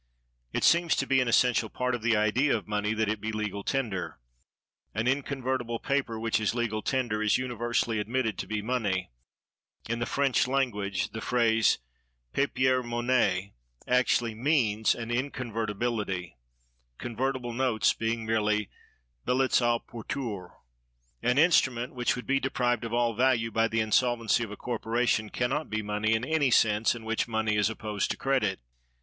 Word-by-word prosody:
It - - -2
seems 170 0 +4
to 135 - 0
be 135 -1 +3
an 125 - 0
essential 120 -1 +3
part 125 +2 -2
of 120 - -2
the 115 -1 +2
idea 115 +6 +2
of 105 - -10
money 105 +1 -1
that 110 0 0
it 105 0 -2
be 110 +1 -3
legal 105 -2 -3
tender. 115 -9 -2 0.8
An 110 +3 0
inconvertible 130 -3 -1
paper 135 -4 -1
which 115 0 0
is 110 +1 0
legal 115 -3 -1
tender 120 -5 -1
is 105 -1 +3
universally 120 -2 -1
admitted 110 0 -1
to - - -4
be 105 -1 -3
money; 105 - -1 0.8
in 115 +1 -2
the 120 - -2
French 140 -2 +2
language 105 -8 -1
the 110 - -6
phrase 115 -2 +3 0.6
papier 130 -2 +2
monnaie 120 -6 0 0.3
actually 125 -2 +2
means 115 -4 +2
inconvertibility, 115 - -3 0.6
convertible 120 +1 -3
notes 115 -4 +2
being 115 0 -2
merely 105 -2 0 0.5
billets 130 +1 +2
à 120 -1 +2
porteur. 115 -6 -6 0.7
An 125 +2 +1
instrument 130 -7 +3
which 125 -2 0
would 125 - -7
be 135 0 +2
deprived 125 -3 0
of 115 - -5
all 120 0 +1
value 120 -1 +2
by 115 +1 +2
the 115 0 0
insolvency 115 +1 +2
of 115 - -5
a 105 - -8
corporation 115 -2 -1
can 125 +3 -1
not 150 +2 -2
be 110 0 -2
money 105 +2 0
in 110 +2 -1
any 155 -2 +2
sense 110 -1 +3
in 115 -2 -9
which 110 0 -1
money 110 -2 0
is 105 0 +2
opposed 105 -2 -3
to - - -2
credit. 130 -9 0
115 Hz, 160 wpm, -28 LUFS, 110-125 Hz, 0.8 s, seems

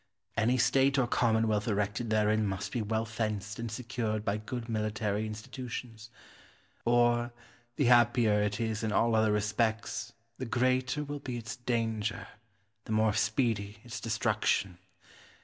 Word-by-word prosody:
Any 120 +4 +2
state 135 +2 +3
or 130 - +4
commonwealth 110 -3 +1
erected 105 +2 -1
therein 110 0 +2
must 95 +1 -3
be 120 - -1
well 110 +1 -1
fenced 110 -1 -3
and 115 -1 -4
secured 110 -2 -3
by 100 0 +1
good 115 +2 -5
military 110 -1 -1
institutions; 115 +1 -7 0.8
or, 120 0 +3 0.4
the 140 - +1
happier 120 -3 +5
it 105 +1 -1
is 110 -2 -1
in 110 -1 -1
all 115 +3 +3
other 110 -1 +3
respects, 110 +2 -1 0.3
the 130 - -3
greater 130 +4 +1
will 145 0 -5
be 125 -3 -5
its 115 +1 -6
danger, 110 -4 -2 0.6
the - - -6
more 110 0 +3
speedy 110 -2 0
its 120 -3 -6
destruction. 90 -3 0
110 Hz, 140 wpm, -31 LUFS, 105-120 Hz, 0.8 s, happier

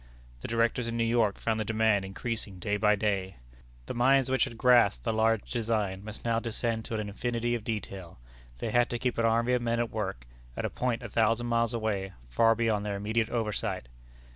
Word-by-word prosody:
The - - -6
directors 115 +1 +1
in 115 0 -3
New 115 - +2
York 115 -3 +2
found 110 -1 -1
the - - +1
demand 110 -2 +2
increasing 100 0 -4
day 100 +3 -1
by 105 0 +3
day. 100 -2 -1 0.5
The - - -5
minds 130 +2 +3
which 130 -2 +3
had 115 - -8
grasped 115 - +4
the - - +1
large 110 0 +1
design 105 -5 -1
must 110 +2 -8
now 115 -1 +2
descend 115 -1 -2
to 115 - -4
an 105 -1 -2
infinity 120 +3 -2
of 120 -3 -2
detail. 100 -5 -5 0.4
They - - -3
had 120 0 +3
to 120 - -2
keep 125 -1 -1
an 115 - +3
army 115 +2 +2
of 125 - +2
men 115 0 0
at 120 -2 -1
work, 95 - -4 0.3
at - - -2
a - - -2
point 125 -1 -1
a 120 - -6
thousand 115 +2 +2
miles 115 0 +1
away, 100 -4 -2 0.2
far 115 - +4
beyond 110 -3 +1
their 105 -1 -2
immediate 110 +3 0
oversight. 105 - -2
115 Hz, 210 wpm, -29 LUFS, 105-115 Hz, 0.5 s, grasped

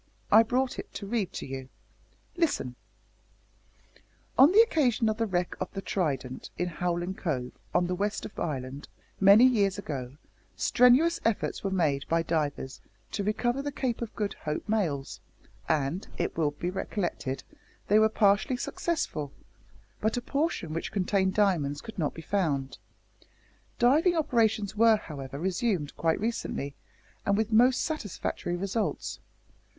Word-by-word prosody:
I 220 - +9
brought 250 +3 0
it - - -7
to 200 - -5
read 205 -2 -1
to - - -5
you. 130 -1 -6 0.7
Listen: 315 - 0 1.6
`On 275 +5 +7
the 425 +4 +8
occasion 265 - +2
of 215 - -1
the 225 0 0
wreck 175 -2 -1
of - - -3
the 195 - -4
Trident 135 -10 -2
in 180 - 0
Howlin' 175 +1 -2
Cove, 130 -10 -3 0.2
on 175 - +2
the 180 - -1
west 205 +3 -2
of - - -8
Ireland, 135 -2 -4 0.3
many 200 +5 +8
years 205 -6 +3
ago, 140 -8 -5 0.4
strenuous 265 +8 +4
efforts 225 -2 -1
were 195 - 0
made 155 -7 0
by 165 0 +2
divers 150 -5 -2 0.3
to 205 - -2
recover 240 +5 0
the 290 +1 -3
Cape 255 -4 -2
of 230 - -5
Good 205 -2 -2
Hope 150 0 -4
mails, 170 -11 -1 0.5
and, 155 +6 0
it - - -2
will 160 -3 +2
be 175 +5 -4
recollected, 170 -8 -3 0.4
they 210 +2 +5
were 220 0 +5
partially 210 +4 +3
successful, 245 - -2 0.7
but 220 +3 0
a - - -1
portion 280 - -1
which 165 - -3
contained 190 -1 +1
diamonds 165 -9 +2
could 220 +3 -9
not 150 - -1
be 165 - -8
found. 150 -10 -1 1.0
Diving 300 +9 +4
operations 225 -9 +1
were, 225 0 +5
however, 140 -7 -7
resumed 180 -2 -1
quite 165 -1 +1
recently, 215 -10 -3 0.5
and 200 0 +2
with 220 +1 0
most 250 +3 +5
satisfactory 205 - -3
results. 195 +5 -2
195 Hz, 145 wpm, -28 LUFS, 155-230 Hz, 1.6 s, I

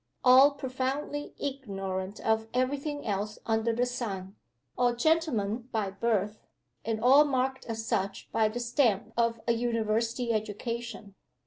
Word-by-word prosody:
All 265 +3 +7
profoundly 275 +2 -3
ignorant 195 -8 -4
of 220 0 +1
every 255 +3 +1
thing 290 0 -5
else 210 0 -2
under 225 0 +1
the 240 +2 +1
sun. 205 -6 -4 0.4
All 245 -1 +2
gentlemen 245 -6 +1
by 210 -3 -1
birth, 210 0 -1 0.4
and 225 -1 -1
all 265 +6 +7
marked 265 -2 -1
as 225 -1 -4
such 195 -2 -2
by 220 -1 +3
the 220 +3 -4
stamp 240 -4 +1
of 230 -1 +1
"a - - +4
University 230 0 0
education." 215 0 -4
230 Hz, 135 wpm, -29 LUFS, 215-255 Hz, 0.4 s, All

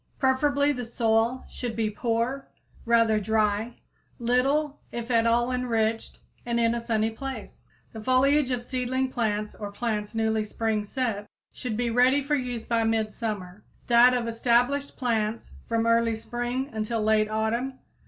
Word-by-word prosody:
Preferably 285 +2 +2
the 250 -3 -3
soil 230 +1 +1
should 240 -3 -5
be 220 -1 0
poor, 235 +5 -1 0.4
rather 230 -2 +4
dry, 215 +2 0 0.4
little 270 +5 +1
if 235 +1 -5
at 230 -1 +3
all 240 +2 +2
enriched 230 -3 -1 0.2
and 235 -1 -1
in 230 0 +3
a 235 - -2
sunny 225 -1 0
place. 270 +4 -8 0.2
The 220 - -7
foliage 260 +3 +3
of 245 -2 -1
seedling 260 +1 -1
plants 215 -3 -1
or 205 -1 -7
plants 210 -1 -3
newly 220 -1 +1
spring 215 0 -1
set 220 -3 -2 0.3
should 230 -4 -4
be 240 0 0
ready 255 +4 +4
for 290 +2 -2
use 250 -4 -1
by 230 -1 +1
midsummer; 215 -3 -2 0.2
that 245 +1 +6
of 240 -2 -1
established 245 +5 +1
plants 225 -3 -1 0.2
from 230 -1 0
early 230 0 +3
spring 240 +4 -3
until 220 +1 -2
late 215 0 +3
autumn. 230 +5 -1
235 Hz, 150 wpm, -26 LUFS, 220-250 Hz, 0.4 s, that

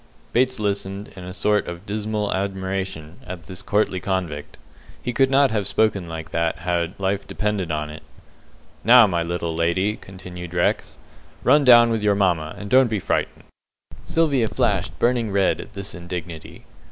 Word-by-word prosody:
Bates 130 0 +2
listened, 100 -1 -2
in 90 - -9
a 90 - -6
sort 105 +2 +1
of 85 +2 -7
dismal 105 0 -2
admiration, 95 -4 -3
at 90 -2 -8
this 90 +3 -6
courtly 100 -2 0
convict. 90 -6 -3 0.4
He 125 - -4
could 135 +2 +3
not 135 0 +4
have 105 -3 -1
spoken 100 -4 +1
like 80 0 -7
that 85 0 0
had 85 +1 -2
life 100 +1 -1
depended 105 -4 -2
on 75 -1 -2
it. 75 - -10 0.8
"Now, 120 +1 +8
my 85 -4 0
little 85 0 -2
lady," 95 +6 +1
continued 90 -2 -9
Rex, 85 - 0 0.5
"run 145 0 +5
down 120 -2 +7
with 110 -1 0
your 105 -1 +3
mamma, 85 -6 +1
and 105 - -7
don't 130 +4 +5
be 110 -2 -1
frightened." - - -2 0.6
Sylvia 140 -8 +2
flashed 100 -2 0
burning 120 -2 +1
red 95 -1 +2
at 120 - -13
this 100 -1 -5
indignity. 85 -2 -7
95 Hz, 165 wpm, -22 LUFS, 85-105 Hz, 0.8 s, Now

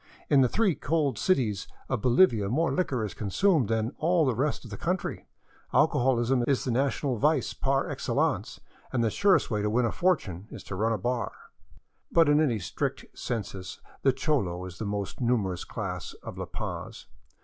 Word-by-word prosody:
In 140 -2 +6
the 125 - +4
three 215 - +2
cold 145 -8 0
cities 115 - +1 0.2
of 130 -5 -1
Bolivia 120 - +4
more 160 +8 +1
Hquor 130 -11 0
is 105 - -6
consumed 140 - +2
than 110 +1 0
in - - -17
all 165 0 +3
the 130 - +2
rest 135 +3 -1
of 115 - -10
the - - -4
country; 180 +1 -2 0.5
alcoholism 125 0 +3
is 135 -2 +2
the 130 - -1
national 135 +1 0
vice - - +2
par - - 0
excellence, - - -1 0.3
and 120 -3 +1
the 110 - +1
surest 200 -8 +3
way 105 -1 0
to 105 - 0
win 120 +3 +2
a 115 - 0
fortune 105 - 0
is - - -9
to 95 - -6
run 110 +4 +1
a 110 - +1
bar." 120 +4 -1 0.8
But 165 -3 +5
in 145 +1 +5
any 130 -8 +2
strict 90 - -3
census 100 -6 -5 0.2
the 135 - +4
cholo 100 - -1
is 90 -2 -9
the 110 - -3
most 100 +3 -4
numerous 105 -7 0
class 90 -7 -5
of - - -7
La - - -4
Paz. - - -6
120 Hz, 185 wpm, -28 LUFS, 105-145 Hz, 0.8 s, In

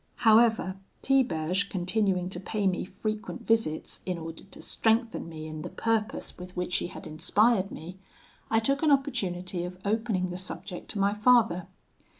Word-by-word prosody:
"However, 220 -4 +5 0.3
Tiberge 195 -8 +2
continuing 185 0 +1
to 180 - -3
pay 205 +2 -2
me 185 -2 +1
frequent 215 +4 -5
visits 225 -9 0
in 180 -2 -2
order 165 0 -7
to 195 - -11
strengthen 225 -5 +1
me 155 -1 -7
in 155 0 -6
the - - -5
purpose 225 -4 -1
with 180 0 -9
which 180 0 0
he - - -2
had - - -10
inspired 195 +6 +2
me, 180 +4 -8 0.5
I 225 - +3
took 275 +5 +1
an 315 - +3
opportunity 190 -11 0
of 180 +1 -6
opening 205 -4 0
the 180 - -4
subject 185 0 -7
to 205 - -3
my 200 +1 +3
father. 210 -5 +4
195 Hz, 160 wpm, -28 LUFS, 180-225 Hz, 0.5 s, However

